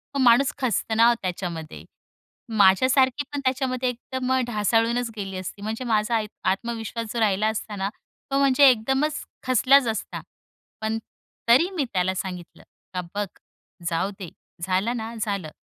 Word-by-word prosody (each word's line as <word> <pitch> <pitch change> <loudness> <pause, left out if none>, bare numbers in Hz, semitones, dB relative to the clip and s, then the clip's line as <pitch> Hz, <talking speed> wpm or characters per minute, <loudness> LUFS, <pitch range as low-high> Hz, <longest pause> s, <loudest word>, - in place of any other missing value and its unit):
मग 275 - +1
माणूस 250 +2 +5
खचतं 225 -3 -1
ना 230 - +7
हो 240 - +5
त्याच्यामध्ये. 175 -4 -5 0.7
माझ्यासारखी 260 +8 +4
पण 285 - -1
त्याच्यामध्ये 255 -1 0
एकदम 255 +1 -3
ढासळूनच 230 +2 +1
गेली 195 -3 -5
असती, 185 +2 -7
म्हणजे 220 +4 -4
माझा 220 0 +1
आय 220 -1 0 0.3
आत्मविश्वास 230 +1 -4
जो 235 - -2
राहिला 215 -1 +2
असता 215 -1 -4
ना, 195 0 -2 0.4
तो 275 - +2
म्हणजे 275 0 +6
एकदमच 265 +6 0 0.2
खचलाच 255 +1 +4
असता. 220 -2 -3 0.6
पण 220 +1 -1 0.5
तरी 295 +10 +6
मी 290 -6 0
त्याला 185 0 +1
सांगितलं, 180 -2 -6 0.3
का 180 - -2
"बघ, 205 0 0 0.6
जाऊ 175 +4 -1
दे, 185 -4 -6 0.3
झालं 190 +6 0
ना 225 +1 -5
झालं" 200 -7 -2
225 Hz, 145 wpm, -24 LUFS, 195-255 Hz, 0.7 s, ना